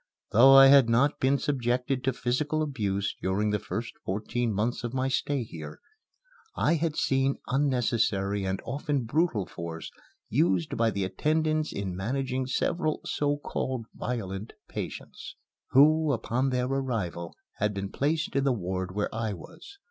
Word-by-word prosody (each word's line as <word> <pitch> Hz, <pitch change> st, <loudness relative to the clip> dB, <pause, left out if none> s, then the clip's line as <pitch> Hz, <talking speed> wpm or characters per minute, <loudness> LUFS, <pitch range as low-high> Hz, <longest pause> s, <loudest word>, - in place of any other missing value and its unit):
Though 135 Hz, +5 st, +8 dB
I 135 Hz, 0 st, +10 dB
had 135 Hz, -3 st, +7 dB
not 125 Hz, +5 st, +3 dB
been 135 Hz, +2 st, +3 dB
subjected 130 Hz, -2 st, -1 dB
to 130 Hz, -, +3 dB
physical 145 Hz, +6 st, -1 dB
abuse 100 Hz, -9 st, -2 dB
during 100 Hz, +3 st, 0 dB
the 105 Hz, -, 0 dB
first 115 Hz, +3 st, -5 dB
fourteen 115 Hz, +4 st, -2 dB
months 110 Hz, +5 st, -1 dB
of 120 Hz, +1 st, -4 dB
my 130 Hz, 0 st, +1 dB
stay 135 Hz, 0 st, 0 dB
here, 80 Hz, -8 st, -9 dB, 0.8 s
I 150 Hz, -, +2 dB
had 165 Hz, -1 st, 0 dB
seen 135 Hz, -1 st, +1 dB
unnecessary 115 Hz, -7 st, +1 dB
and 95 Hz, 0 st, -1 dB
often 140 Hz, -1 st, -1 dB
brutal 120 Hz, -, +1 dB
force 85 Hz, -1 st, -7 dB, 0.4 s
used 90 Hz, -1 st, +1 dB
by 115 Hz, 0 st, +2 dB
the 100 Hz, -2 st, -2 dB
attendants 155 Hz, -, 0 dB
in 95 Hz, -3 st, -4 dB
managing 130 Hz, +5 st, -2 dB
several 155 Hz, +4 st, 0 dB
so 145 Hz, 0 st, 0 dB
called 130 Hz, -4 st, -3 dB
violent 105 Hz, -4 st, -4 dB
patients, -, -, -7 dB, 0.3 s
who, 155 Hz, +3 st, +5 dB
upon 125 Hz, +3 st, 0 dB
their 125 Hz, -1 st, 0 dB
arrival, 115 Hz, -11 st, -3 dB, 0.2 s
had 105 Hz, +1 st, +1 dB
been 100 Hz, -1 st, -5 dB
placed 155 Hz, +1 st, -1 dB
in 135 Hz, -, +2 dB
the 135 Hz, -, +3 dB
ward 95 Hz, -4 st, -3 dB
where 105 Hz, -, -1 dB
I 110 Hz, -2 st, -2 dB
was. 250 Hz, -, -12 dB
125 Hz, 150 wpm, -28 LUFS, 100-140 Hz, 0.8 s, I